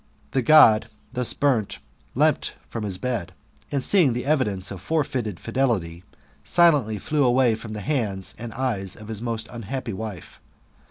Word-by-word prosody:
The 130 - +1
God, 120 -6 +6 0.3
thus 125 -1 +2
burnt, 120 - 0 0.4
leaped - - +1
from 110 -3 -4
the 95 - -3
bed, 100 -5 -3 0.4
and 140 -2 -1
seeing 175 -11 +4
the 125 +2 -3
evidence 105 -11 0
of 95 -3 -7
forrei 140 - -1
ted' 105 -5 -5
fidelity, 110 -9 -1 0.4
silently 145 -11 +3
flew 150 +7 0
away 125 -1 +4
from 110 0 -7
the 105 +2 -7
eyes 105 -10 -1
and 120 -1 -6
hand^ 110 -7 -3
of 110 0 -11
his 110 -1 -5
most 115 -2 -3
unhappy 120 0 -5
wife. 105 -3 -7
115 Hz, 160 wpm, -24 LUFS, 105-130 Hz, 0.4 s, God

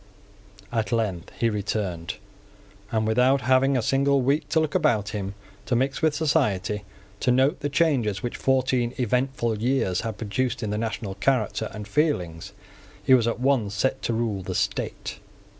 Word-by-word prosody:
At 115 -1 -1
length 105 -6 -1
he 115 - +3
returned; 100 -5 -2 0.8
and, 110 -1 +1
without 125 +5 +3
having 130 +2 +3
a 120 - 0
single 140 +1 +3
week 140 +4 +1
to 160 - +3
look 155 -1 0
about 120 - +2
him, 100 -2 -4 0.3
to 125 - +1
mix 135 +5 0
with 160 -2 +2
society, 105 - 0 0.3
to - - 0
note 130 +6 +3
the 145 - -2
changes 135 - +1
which 120 - -3
fourteen 130 -2 +1
eventful 125 -2 0
years 120 -7 +1
had 110 -2 -4
produced 115 +4 -2
in 105 - -2
the 105 - -1
national 110 -3 -3
character 110 0 0
and 105 -1 -7
feelings, 95 - -1 0.5
he 130 - +5
was 120 -3 +5
at 115 - -1
once 125 -6 +1
set 130 +6 0
to 115 - -1
rule 110 -4 -1
the 95 0 -5
state. - - -2
120 Hz, 165 wpm, -25 LUFS, 105-135 Hz, 0.8 s, he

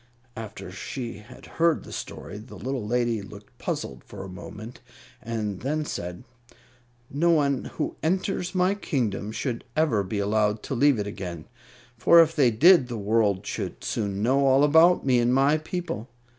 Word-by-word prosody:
After 110 -2 -8
she 120 -5 -6
had 120 +4 -14
heard 165 -1 +1
the - - -11
story, 105 - -7
the 110 0 -12
little 125 +5 -4
lady 120 -2 0
looked 100 - -13
puzzled - - -4
for 95 -2 -9
a - - -7
moment 105 +5 -9 0.4
and 105 -4 -3
then 150 +4 -2
said, 90 -5 -5 0.9
"No 165 +5 +2
one 140 -5 +2
who - - -2
enters 185 +2 -1
my 185 +1 +3
kingdom 115 - -2
should 115 +1 -3
ever 150 -10 +3
be 100 +2 -4
allowed 105 +1 +1
to - - -4
leave 140 0 +4
it 105 - -2
again, 90 -6 -6 0.5
for 170 +7 +7
if 160 -1 +5
they 135 -5 +5
did 140 - +6
the 120 -2 -5
world 105 -2 +1
should - - -5
soon 100 -2 -2
know 135 +4 +3
all 135 +1 +5
about 160 +4 +5
me 125 -2 +4
and 120 +1 +2
my 140 +3 +3
people. 165 -6 -5
120 Hz, 170 wpm, -26 LUFS, 105-150 Hz, 0.9 s, for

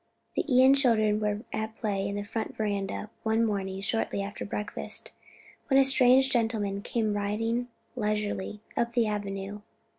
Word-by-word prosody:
The - - +1
Ion 260 +2 +7
children 220 -6 +3
were 210 0 -1
at 220 0 -3
play 200 -3 -1
in 200 - -3
the 205 - -2
front 220 +2 -4
veranda 205 0 -2
one 225 +1 +2
morning 195 -3 -2
shortly 200 -1 -1
after 200 +1 -6
breakfast, 210 +1 -3 0.6
when 270 -4 +5
a - - +7
strange 265 0 +5
gentleman 220 -4 0
came 220 -1 -1
riding 225 +4 -1 0.3
leisurely 210 -2 -2
up 235 0 0
the 235 -2 +3
avenue. 205 -1 -4
215 Hz, 150 wpm, -28 LUFS, 205-230 Hz, 0.6 s, Ion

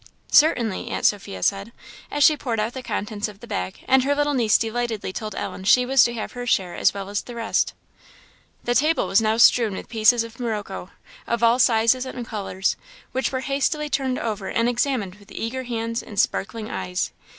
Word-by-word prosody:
"Certainly!" 240 - +3
Aunt - - -3
Sophia 145 - 0
said, 195 +3 0 0.4
as 290 - +1
she 305 - +7
poured 240 -6 -3
out 220 +3 -1
the 260 - -6
contents 210 -3 -3
of 205 -2 -12
the - - -11
bag; 90 0 -4
and 260 0 +4
her 285 +2 +1
little 290 0 +1
niece 230 -6 +4
delightedly 225 -3 -3
told 215 -1 -5
Ellen 190 - -5
she 250 +6 +5
was 265 0 +5
to 240 - -1
have 220 - -5
her 245 0 -6
share 185 -6 +1
as - - +2
well 200 -1 -6
as 205 +1 -2
the 240 - -10
rest. 230 -1 0 0.9
The 240 - 0
table 310 +6 +2
was 195 - +3
now 220 0 +1
strewn 235 -2 +5
with - - -8
pieces 230 +1 +4
of 230 +1 -11
morocco, 210 -6 -4 0.4
of 235 0 -1
all 230 +2 +4
sizes 235 +2 +3
and 250 -2 -6
colours, 195 -3 -2 0.3
which 260 - -1
were 260 -1 -2
hastily 295 +2 -1
turned 260 -2 0
over 210 -4 -3
and 230 +1 +1
examined 240 -6 -1
with 205 0 -18
eager 255 +3 -4
hands 230 -1 -3
and 205 -3 -6
sparkling 215 +1 -1
eyes. 180 -3 -3
230 Hz, 200 wpm, -23 LUFS, 210-255 Hz, 0.9 s, she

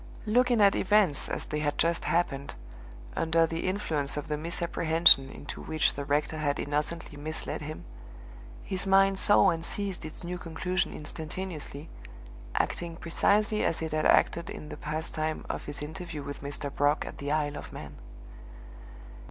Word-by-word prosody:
Looking 240 +1 +3
at 200 -1 +6
events 195 -7 +3
as - - -3
they 150 - -3
had 145 -1 -1
just 170 0 +1
happened, 140 -5 0 0.6
under 165 0 +3
the 165 +2 -3
influence 155 -8 0
of 150 - -4
the 150 - 0
misapprehension 165 -2 +4
into 145 - -8
which 155 -1 +1
the 140 - -4
rector 150 +2 0
had 145 -2 0
innocently 150 +1 -3
misled 155 +2 -4
him, 155 +1 -7 0.8
his 190 +1 0
mind 195 0 +5
saw 200 -2 +6
and 165 -1 -3
seized 195 +1 -3
its 155 +2 -8
new 180 +1 -4
conclusion 180 +3 -1
instantaneously, 155 -1 -6 0.7
acting 170 -1 -1
precisely 205 +6 +2
as 165 - +1
it 160 - -3
had 155 0 0
acted 170 0 +3
in 150 - -7
the - - -6
past 155 +2 -4
time 155 0 -2
of - - -4
his 145 0 -6
interview 160 -1 -6
with 140 0 -7
Mr. 140 0 -5
Brock 145 +1 +2
at - - -8
the 145 +1 -3
Isle 150 -1 0
of - - -8
Man. - - -9
160 Hz, 160 wpm, -29 LUFS, 150-180 Hz, 0.8 s, at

